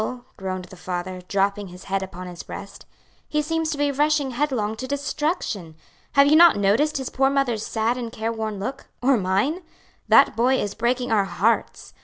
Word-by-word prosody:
groaned 185 -1 -4
the 185 - -13
father, 180 0 -5
dropping 200 +1 0
his 180 0 -12
head 195 0 -1
upon 185 -1 -7
his 175 -1 -8
breast, - - -10 0.4
"he 300 - 0
seems 325 +1 -1
to 300 - -2
be 290 0 +1
rushing 290 -1 +1
headlong 240 -5 -1
to 260 +3 -6
destruction. 285 - -2 0.4
Have 280 0 +6
you 295 +2 +5
not 340 +1 +8
noticed 220 +11 +2
his 265 -2 -4
poor 270 +1 +2
mother's 260 -6 0
sad 230 +3 -1
and 235 -2 -5
careworn 220 -1 -3
look? 260 +8 -5 0.2
or 270 +1 +5
mine? 205 - 0 0.5
That - - +6
boy 250 +3 +3
is 205 - -2
breaking 245 +1 -1
our 205 -3 +3
hearts. 225 +4 -1
230 Hz, 180 wpm, -23 LUFS, 195-280 Hz, 0.5 s, not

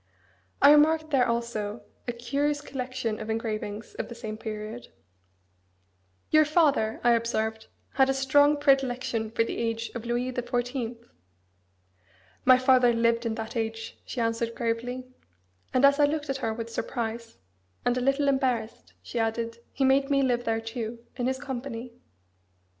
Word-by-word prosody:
I 285 - +10
remarked 310 +1 +4
there 255 -3 +4
also 235 -2 -2 0.2
a - - +1
curious 280 +5 -1
collection 255 -5 -4
of 215 - -6
engravings 220 -1 -3
of - - -3
the 235 - -8
same 215 -2 -6
period. 215 +1 -6 1.4
"Your 310 0 +7
father," 295 -8 +2
I 240 - +5
observed, 220 -1 0 0.3
"had 265 0 +4
a - - +3
strong 285 +2 +4
predilection 255 -5 +1
for 230 +1 +1
the - - -4
age 230 0 -2
of 235 - -5
Louis 240 +2 -1
the 250 - -2
Fourteenth." 245 -1 -3 1.4
"My 255 0 +8
father 255 -2 +5
lived 230 0 +2
in 220 - -2
that 225 +1 -6
age," 225 0 -4
she 255 - -6
answered 230 0 -1
gravely. 240 +2 -2 0.7
And 255 +2 +4
as 280 +1 +5
I 290 - +7
looked 295 -1 -1
at 270 - -2
her 240 -4 -2
with 230 +1 -5
surprise, 230 -1 -4 0.5
and 245 - +2
a 250 - -1
little 275 +2 +2
embarrassed, 260 -5 -1
she 240 - -4
added, 230 +1 -1
"He 275 - -1
made 275 +1 +3
me 275 -1 +3
live 245 -2 +1
there 225 0 0
too, 230 0 -6
in 245 -1 -1
his 260 0 0
company." 255 -3 -6
240 Hz, 160 wpm, -27 LUFS, 230-270 Hz, 1.4 s, I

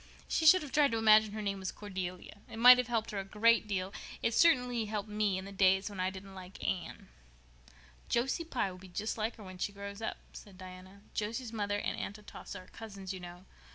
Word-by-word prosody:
She 320 - +1
should 370 +1 +8
have 285 - -8
tried 290 -3 +4
to - - +1
imagine 215 -1 +5
her 215 0 -4
name 200 -1 -2
was 190 -1 -3
Cordelia. 185 -1 -6
It - - -8
might 250 +2 +9
have 250 - 0
helped 230 -2 -1
her 205 - -3
a - - -3
great 215 +3 +3
deal. 190 -1 -2 0.3
It 230 - +1
certainly 250 -7 +3
helped 210 0 -4
me 210 -2 0
in 190 - -5
the 200 - -8
days 190 +1 +3
when 200 - -8
I 185 +1 +1
didn't 190 +1 -10
like 185 0 -10
Anne." 185 -2 -3 1.0
"Josie 265 +8 0
Pye 260 - -2
will 185 - -11
be 190 - -12
just 200 +5 -3
like 220 +1 -2
her 215 - -12
when 185 -1 -10
she 200 - -1
grows 200 +1 -8
up," 220 - -3 0.2
said 195 -3 -12
Diana. 185 +1 -11
"Josie's 225 +3 -3
mother 205 -2 -1
and - - -3
Aunt 200 - -5
Atossa 205 -2 -9
are - - -20
cousins, 200 -4 -8
you 190 - -7
know. 175 +1 -10
205 Hz, 225 wpm, -32 LUFS, 190-225 Hz, 1.0 s, might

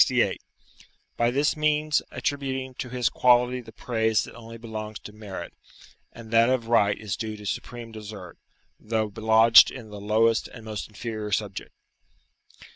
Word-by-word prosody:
68.] - - +1 0.7
by 120 0 +2
this 140 +4 +1
means 155 0 +2
attributing 135 -2 -3
to 125 0 -6
his 125 -1 0
quality 125 0 +3
the 115 -2 -13
praise 110 -2 0
that - - -10
only 115 0 -10
belongs 110 -2 -6
to 105 - -11
merit, 105 -3 -8 0.6
and 115 -1 -12
that 115 +1 +5
of 130 -3 +1
right 105 -3 +3
is 105 -3 -4
due 110 0 -5
to 105 - -11
supreme 115 +3 -5
desert, 105 -5 -9 0.4
though 110 -1 -1
lodged 110 +1 +7
in 115 -5 -10
the 105 -1 -8
lowest 110 +2 +2
and 115 -2 -12
most 110 -1 -5
inferior 110 -1 -5
subject. 100 -1 -2
115 Hz, 155 wpm, -26 LUFS, 110-125 Hz, 0.7 s, lodged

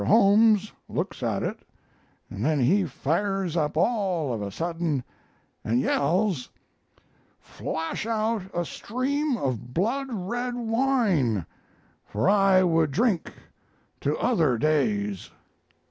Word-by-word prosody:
Holmes 210 0 +5 0.2
looks - - -3
at - - -1
it - - -3 0.7
and 100 - -6
then 150 +1 +2
he 185 +10 +3
fires 175 +5 -1
up 150 -2 0
all 180 - +1
of 110 - -3
a 100 - -3
sudden 165 - -2 0.6
and 115 +3 +1
yells: 165 +3 +1 0.9
"'Flash 165 +6 -4
out 225 -1 0
a 175 0 -2
stream 265 - -2
of 125 - -3
blood 245 +10 0
red 240 +4 -3
wine! 225 - +1 0.6
For 110 +4 -2
I 195 -2 +5
would 165 -3 +2
drink 200 - 0 0.7
to 145 +2 -1
other 165 - +2
days.' 105 - 0
175 Hz, 115 wpm, -26 LUFS, 140-220 Hz, 0.9 s, Holmes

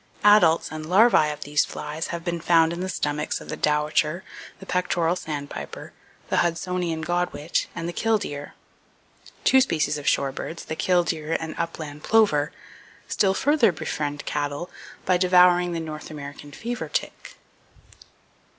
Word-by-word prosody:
Adults 195 -6 +5
and 155 0 -5
larvae 195 -5 +5
of 150 - -6
these 145 +1 +2
flies 155 +2 -5
have 170 -1 -5
been 170 -1 -2
found 165 -1 +4
in 170 - -5
the 185 +1 -3
stomachs 150 -3 -2
of - - -12
the - - -3
dowitcher, 150 +3 +1 0.4
the 195 - -11
pectoral 180 -2 0
sandpiper, 145 -5 -6 0.4
the - - +1
hudsonian 170 -1 -1
godwit, 175 -2 -1
and 170 0 -4
the 175 - -4
killdeer. 195 -11 -1 0.9
Two 265 - +6
species 155 - 0
of 140 - -8
shorebirds, 140 +4 -1
the 160 - -4
killdeer 165 -3 +1
and 160 -1 -5
upland 150 -3 -5
plover, 185 -10 +3 0.6
still 195 -1 +2
further 285 -5 +3
befriend 145 -3 -4
cattle 145 +4 -3 0.3
by 185 -1 +3
devouring 180 -1 +5
the 165 - -2
North 155 -1 -7
American 145 -1 -9
fever 240 +9 -5
tick. - - -4
165 Hz, 140 wpm, -24 LUFS, 150-180 Hz, 0.9 s, Two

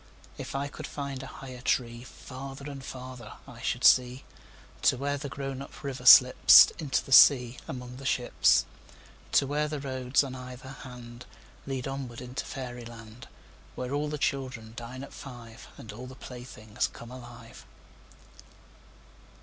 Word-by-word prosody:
If - - -7
I 140 +1 -1
could 140 - -8
find 140 -2 -5
a 135 - -8
higher 130 -2 -10
treeFarther 130 +3 -4
and 140 -2 -8
farther 125 -4 -9
I - - -12
should - - -2
see, 125 +1 +5 0.6
To - - +3
where 140 +2 -1
the 140 0 -5
grown 135 -1 -5
up 140 - -11
river 130 -2 -5
slipsInto 130 +3 +7
the - - -11
sea 125 -2 +7
among 125 -1 -7
the 135 - -10
ships. 125 -2 +3 0.7
To 140 - +4
where 150 +2 -1
the 150 -1 -4
roads 130 0 0
on 135 -2 -6
either 130 +1 -9
handLead 125 +1 -9
onward 135 -3 -6
into 125 +1 -6
fairy 125 -3 -7
land, 115 0 -12 0.5
Where 125 +1 -4
all 145 +1 -1
the 150 - -3
children 130 -5 -3
dine 125 +3 -7
at 140 - -11
five, 120 -4 -11
And 110 - -9
all 125 +4 -9
the 130 - -11
playthings 120 -5 -5
come 115 +1 -12
alive. 120 -1 -12
130 Hz, 150 wpm, -28 LUFS, 125-135 Hz, 0.7 s, slipsInto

